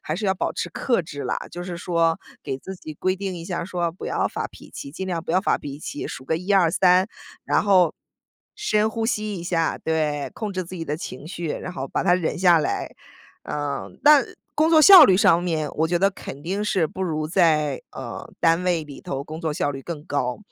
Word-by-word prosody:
还 155 - -3
是 210 - -4
要 190 - +3
保 - - -2
持 - - -3
克 235 -9 0
制 145 -3 -7
啦， - - -1
就 175 - -6
是 175 -1 -5
说 165 -2 +1 0.2
给 130 - -3
自 190 +8 -8
己 155 -3 -9
规 185 +5 0
定 190 -1 -4
一 165 - -7
下 175 0 -3
儿 170 - -3
说， 175 -3 -1
不 185 - -8
要 - - 0
发 - - -3
脾 - - -15
气， 140 - -8
尽 190 +3 -5
量 170 -3 -2
不 - - -4
要 185 - +4
发 - - +1
脾 140 0 -7
气， 145 - -5
数 130 - -7
个 160 - 0
123， 185 +1 +3 0.4
然 - - +2
后 185 -5 +4 0.6
深 220 - +1
呼 225 0 -3
吸 215 -3 -1
一 170 - -6
下， 165 -2 0
对， 155 -3 -1
控 210 -3 -4
制 185 0 -2
自 180 +2 -9
己 165 - -4
的 150 0 -2
情 155 -4 -8
绪， 170 -1 -5
然 180 - -4
后 135 -6 -5
把 - - -1
它 175 - +5
忍 180 -1 -1
下 175 -2 +6
来。 150 - -2 0.5
呃， 145 -1 -3
但 290 -3 +7 0.3
工 310 +2 +3
作 315 - +7
效 360 -1 +11
率 190 - +5
上 175 -3 +4
面， 160 -4 -1
我 160 +1 0
觉 175 0 +1
得 195 +2 +3
肯 145 -6 -9
定 195 +6 -2
是 185 -5 +1
不 190 +5 -6
如 155 -4 -1
在， 155 -5 +2
呃， - - -7
单 165 +1 +3
位 175 -3 0
里 145 -2 -11
头 135 +1 -4
工 155 +2 -7
作 160 -3 -1
效 145 - 0
率 135 - -7
更 155 -2 -6
高， 125 -5 -2
170 Hz, 245 characters per minute, -23 LUFS, 155-190 Hz, 0.6 s, 效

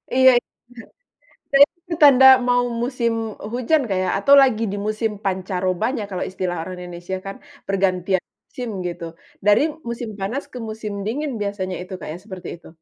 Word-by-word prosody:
Iya, 260 0 +7
itu - - -43 1.1
benar. 285 +2 +8
Nah, 345 - -43
itu 340 - -5
tanda 265 -2 +8 0.2
mau 245 0 +3 0.2
musim, 240 -2 0 0.4
hujan, 255 +5 +2
Kak 190 - 0
ya, 185 - -1
atau 275 +8 +4
lagi 230 -4 +3
di 205 - -4
musim 215 +1 -1
pancarobanya 190 +4 -1
kalau 185 - -3
istilah 185 -1 -3
orang 185 +2 -6
Indonesia 175 +1 -6
kan, 195 - -5 0.3
pergantian 185 -1 0 0.3
musim 245 -2 -6 0.2
gitu, 170 -1 -6 0.4
dari 210 +4 +5 0.3
musim 235 -1 -4
panas 230 +9 -3
ke 250 - -8
musim 215 -1 -6
dingin 285 +6 -2
biasanya 190 -2 -3
itu, 185 - -10
Kak - - -7
ya - - -7
seperti 190 -4 -8
itu? - - -17
210 Hz, 170 wpm, -21 LUFS, 185-250 Hz, 1.1 s, benar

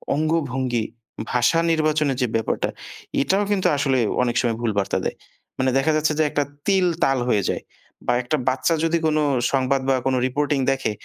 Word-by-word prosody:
অঙ্গভঙ্গি, 130 -7 0 0.5
ভাষা 125 +7 +3
নির্বাচনের 155 -4 +1
যে 125 - +2
ব্যাপারটা 110 - -1 0.5
এটাও 195 +7 +2
কিন্তু 195 -2 +2
আসলে 135 -2 +1 0.3
অনেক 120 -1 -1
সময় 115 -3 -1
ভুল 115 -2 0
বার্তা 95 - -1
দেয়। - - -3 0.4
মানে 130 0 +2
দেখা 140 +4 +2
যাচ্ছে 155 0 +1
যে - - +5
একটা 145 - 0 0.2
তিল, 190 -2 +3 0.2
তাল 135 -1 +2
হয়ে 105 -4 +2
যায়। - - -2 0.4
বা 120 - +3
একটা 150 +5 0
বাচ্চা 130 +5 +1
যদি 165 +1 +2
কোন 155 0 +1 0.3
সংবাদ 135 0 +1
বা 135 - +4
কোন 130 -1 +2
রিপোর্টিং 145 +1 0
দেখে 135 -5 -1
135 Hz, 175 wpm, -22 LUFS, 125-155 Hz, 0.5 s, যে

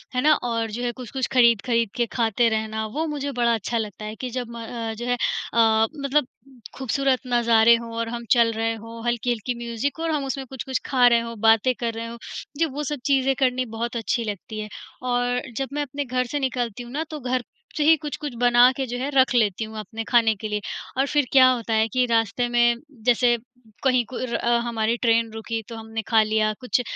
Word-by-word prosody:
है 250 - +2
ना, 305 +1 +5
और 230 -5 -2
जो 240 +3 -4
है 240 - 0
कुछ-कुछ 255 +1 -4
ख़रीद-ख़रीद 235 -2 +3
के 240 - +1
खाते 230 0 +2
रहना, 220 0 -2
वो 300 +9 -2
मुझे 285 -1 -3
बड़ा 235 -2 +2
अच्छा 230 +2 -2
लगता 215 -1 -4
है 215 +1 -6
कि 255 +1 -5
जब 245 -1 -4
म 230 - -6
अ, 225 -1 -4
जो 235 +2 -6
है 245 - +1 0.4
अ, 225 -1 +4
मतलब 280 -1 0 0.5
ख़ूबसूरत 265 0 +1
नज़ारे 235 -1 +5
हों 230 0 -6
और 230 0 -2
हम 235 0 -5
चल 235 -2 +5
रहे 225 +1 -1
हों, 230 +1 -10
हल्की-हल्की 240 0 -1
म्यूज़िक 240 +7 -3
और 330 0 -1
हम 295 -3 -1
उसमें 270 0 -4
कुछ-कुछ 265 0 -3
खा 255 -3 +3
रहे 235 -1 +5
हों, 230 -1 -7
बातें 225 +3 +4
कर 230 -2 -1
रहे 230 +1 -5
हों, 235 - -7
मुझे 320 +3 -3
वो 295 - -2
सब 295 -1 -3
चीज़ें 270 -1 +3
करनी 255 -1 +1
बहुत 235 0 -2
अच्छी 230 +1 -1
लगती 215 +1 -6
है। 215 - -5 0.3
और 245 0 0 0.2
जब 270 -1 -2
मैं 295 - -1
अपने 285 0 -4
घर 255 0 -1
से 290 +4 -3
निकलती 245 -3 -2
हूँ 240 - -11
ना, 300 +3 -2
तो 305 - -6
घर 255 -1 -1 0.3
से 300 - +2
ही 320 +2 +7
कुछ-कुछ 295 -2 -5
बना 245 +1 +6
के 265 - -1
जो 245 - -4
है 265 +3 -2
रख 265 -1 +4
लेती 215 -2 +2
हूँ 220 0 -8
अपने 220 +1 -6
खाने 230 -2 +4
के 215 +2 -6
लिए। 210 0 -2 0.4
और 270 - +3
फिर 290 -1 +2
क्या 255 -1 +7
होता 235 -3 -1
है 220 0 +3
कि 255 0 +3
रास्ते 225 +1 +1
में 240 0 +4 0.3
जैसे 240 -1 +4 0.5
कहीं 255 -2 +3
कुर 255 -1 -4
अ, 235 0 +2
हमारी 230 -1 0
ट्रेन 230 -1 +2
रुकी 225 +1 -4
तो 230 - -7
हमने 225 0 -5
खा 225 -2 +5
लिया 215 0 +1
कुछ, 250 0 0
240 Hz, 220 wpm, -24 LUFS, 225-255 Hz, 0.5 s, ही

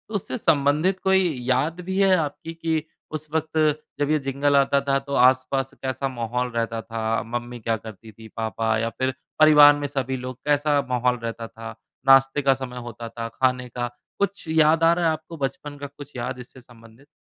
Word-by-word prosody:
उससे 130 -9 -3
संबंधित 150 +6 +2
कोई 190 0 +4 0.2
याद 150 +7 +1
भी 190 +2 -4
है 190 -1 +5
आपकी 160 +1 -4
कि 160 -1 -1 0.3
उस 155 0 -5
वक़्त 160 0 -2 0.4
जब 145 0 0
ये 155 - +3
जिंगल 140 +1 0
आता 140 0 +3
था 135 - +3
तो 140 +1 -8
आस-पास 130 +1 +3
कैसा 135 +1 -2
माहौल 125 0 -3
रहता 115 -1 -2
था? 115 0 -2
मम्मी 120 +1 -5
क्या 115 0 -1
करती 110 0 -11
थी? 110 +1 -13
पापा 110 0 -1
या 115 +1 -1
फिर 130 0 0 0.3
परिवार 150 -1 +8
में 145 - -2
सभी 135 -2 -2
लोग 125 0 -7
कैसा 145 0 +2
माहौल 125 0 +1
रहता 115 0 -4
था? 115 0 -9 0.3
नाश्ते 135 +1 +5
का 135 -1 +4
समय 130 -1 -7
होता 115 0 -8
था? 115 0 -5
खाने 125 -1 0
का? 120 0 -3 0.3
कुछ 200 -3 -2
याद 160 0 +4
आ 165 +1 +6
रहा 175 -1 0
है 160 - +4
आपको 160 +1 -7
बचपन 145 +1 -4
का? 145 0 -6
कुछ 145 0 -13
याद 125 +1 -4
इससे 125 +1 -12
संबंधित? 115 +2 -18
135 Hz, 190 wpm, -24 LUFS, 120-150 Hz, 0.4 s, परिवार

